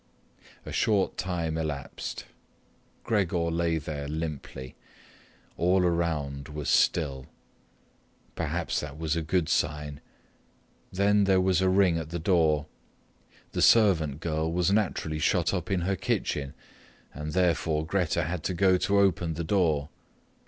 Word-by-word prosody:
A - - -7
short 105 -4 +1
time 85 -3 -2
elapsed. 75 -4 -5 0.8
Gregor 90 -7 0
lay 85 0 0
there 75 -2 -5
limply. 75 -4 -5 0.8
All 90 +2 +3
around 75 -5 -1
was 75 -2 -4
still. 70 -6 +1 1.1
Perhaps - - -2
that 75 -1 -7
was 80 0 -1
a 85 - -1
good 80 +1 0
sign. 75 -1 -1 0.9
Then 100 +2 +3
there 95 -1 +4
was 95 0 +2
ring 95 -2 +3
at 80 -2 -6
the 85 - -3
door. 80 -4 +2 0.9
The - - -2
servant 80 -10 +4
girl 80 -1 -1
was 90 +2 +1
naturally 90 -7 0
shut 85 +2 +1
up 90 -4 -3
in 95 -3 0
her 95 +3 0
kitchen, 70 -5 -2 0.6
and 75 +2 -6
therefore 80 -3 +1
Grete 90 -1 0
had 85 0 -3
to 95 - -1
go 95 +1 +4
to 100 +2 +1
open 90 -4 +2
the 85 - -3
door. 80 -5 +1
85 Hz, 130 wpm, -27 LUFS, 75-95 Hz, 1.1 s, there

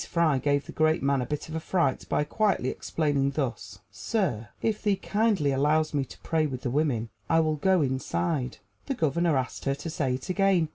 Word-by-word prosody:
Fry 160 -5 +2
gave 145 +1 +1
the - - -8
great 155 -1 +2
man 140 -1 +2
a 125 - -3
bit 150 -1 -3
of 160 0 -4
fright 170 -6 0
by - - +2
quietly 195 - +1
explaining 145 -3 0
thus: 140 -3 -3
"Sir, 135 - -2
if 215 -2 -1
thee 205 -2 +2
kindly 205 -8 +1
allows 150 +3 +2
me 140 -2 0
to - - -13
pray 160 -2 +1
with 130 -3 -5
the 120 - -1
women, 130 -6 0 0.2
I 165 - +4
will 155 -1 0
go 185 +1 +3
inside." 130 - -1 0.3
The 275 - -1
Governor 165 - +1
asked 130 -1 -3
her 140 0 +1
to 145 +4 -6
say 135 -5 0
it 130 - -7
again. 185 -3 +2
150 Hz, 200 wpm, -27 LUFS, 135-170 Hz, 0.3 s, I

